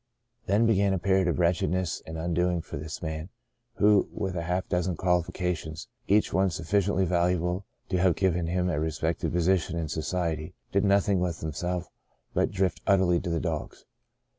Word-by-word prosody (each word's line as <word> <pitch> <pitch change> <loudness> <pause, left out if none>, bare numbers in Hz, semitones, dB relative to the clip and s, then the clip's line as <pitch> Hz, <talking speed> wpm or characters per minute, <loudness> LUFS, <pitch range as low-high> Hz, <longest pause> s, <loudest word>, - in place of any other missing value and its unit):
Then 105 +4 +3
began 100 -3 +3
a - - +1
period 95 0 +2
of 85 - +1
wretchedness 90 0 +1
and 80 0 -6
undoing 85 +1 0
for - - -8
this 80 +3 -6
man 80 +1 -4 0.5
who, 105 0 +4
with 95 -2 -3
half 90 +2 -1
a - - -35
dozen 90 0 0
qualifications, 90 -1 -1 0.2
each 105 +2 +3
one 95 +1 +3
sufficiendy 95 +4 +1
valuable 90 +1 0 0.2
to 90 - +1
have 90 -2 +3
given 90 -3 +1
him 90 +1 0
a 85 -5 0
respected 80 +1 -1
position 85 -1 +1
in 80 -2 -2
society, 80 +1 -2 0.2
did 100 +1 +2
nothing 100 -1 +3
with 90 -2 -2
himself 90 +3 -3 0.5
but - - +2
drift 95 -2 -1
utterly 95 -3 +4
to 90 - -4
the 85 -1 0
dogs. 80 -3 -4
90 Hz, 165 wpm, -27 LUFS, 85-95 Hz, 0.5 s, who